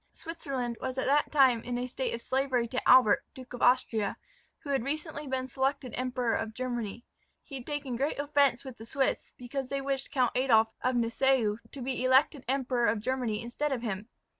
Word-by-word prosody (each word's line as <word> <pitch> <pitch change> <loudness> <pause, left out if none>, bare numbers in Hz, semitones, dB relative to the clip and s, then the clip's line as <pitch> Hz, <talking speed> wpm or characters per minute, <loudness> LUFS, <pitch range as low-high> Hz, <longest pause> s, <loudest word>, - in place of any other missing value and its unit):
Switzerland 275 -8 -4
was 260 0 -3
at 260 - 0
that 290 +2 +2
time 260 -6 +5
in 245 +1 -3
a 245 - -2
state 255 +1 -3
of 235 - -4
slavery 260 -3 0
to 255 +2 -2
Albert, 250 -5 +7
Duke 255 -1 -11
of 245 - -7
Austria, 225 -4 +2 0.5
who 285 - -4
had 270 -4 +1
recently 300 +1 -4
been 260 -1 -2
selected 265 0 -1
Emperor 250 -2 -1
of 220 0 -2
Germany. 240 -3 -4 0.4
He 285 - -15
had 260 -2 -6
taken 285 -5 -3
great 280 +4 -1
offence 285 -3 +2
with 260 -3 -8
the 225 - -10
Swiss, 270 +2 -1
because 255 +1 -5
they 275 - -1
wished 270 0 -2
Count 255 -4 +2
Adolph 225 -4 +3
of 255 0 +1
Nassau 235 -2 +2
to 275 - -8
be 255 0 -2
elected 265 +2 +3
Emperor 255 -2 +1
of 215 0 +1
Germany 235 -2 -2
instead 280 +5 -2
of 250 -3 -2
him. 210 0 -4
255 Hz, 195 wpm, -29 LUFS, 240-275 Hz, 0.5 s, Albert